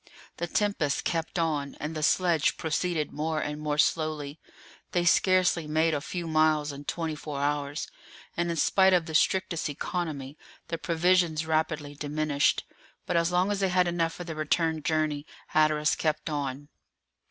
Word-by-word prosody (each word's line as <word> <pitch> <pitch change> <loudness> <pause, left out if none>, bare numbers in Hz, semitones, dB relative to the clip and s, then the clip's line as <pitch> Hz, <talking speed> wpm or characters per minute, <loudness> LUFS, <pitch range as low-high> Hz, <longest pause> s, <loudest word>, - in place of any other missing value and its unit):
The 175 - -2
tempest 185 -7 0
kept 165 +2 -2
on, 150 -4 -1
and 155 +2 -4
the 155 - -3
sledge 170 -1 +2
proceeded 160 -1 -1
more 155 +1 -1
and 150 0 -4
more 150 -1 -1
slowly; 155 -1 0 0.5
they 175 -1 +1
scarcely 180 -2 +3
made 160 +1 +2
a 145 - -1
few 175 +3 -5
miles 155 -2 +2
in 140 +1 -9
twenty 165 0 -2
four 150 -1 -6
hours, 145 +1 -1 0.5
and 170 0 0
in 170 - -1
spite 190 +4 +4
of 175 -2 +3
the 160 - -7
strictest 175 0 +1
economy, 150 -2 -4 0.3
the 165 - -3
provisions 170 -1 +2
rapidly 155 -2 -1
diminished; 145 0 0 0.4
but 180 - -2
as 170 +1 +2
long 180 +3 +2
as 205 - -1
they 195 -1 +1
had 180 0 +3
enough 165 -1 0
for 175 - -7
the 165 -2 -6
return 160 +1 0
journey, 155 -2 0 0.3
Hatteras 155 0 +3
kept 155 0 -1
on. 145 -1 -4
155 Hz, 165 wpm, -28 LUFS, 150-170 Hz, 0.5 s, spite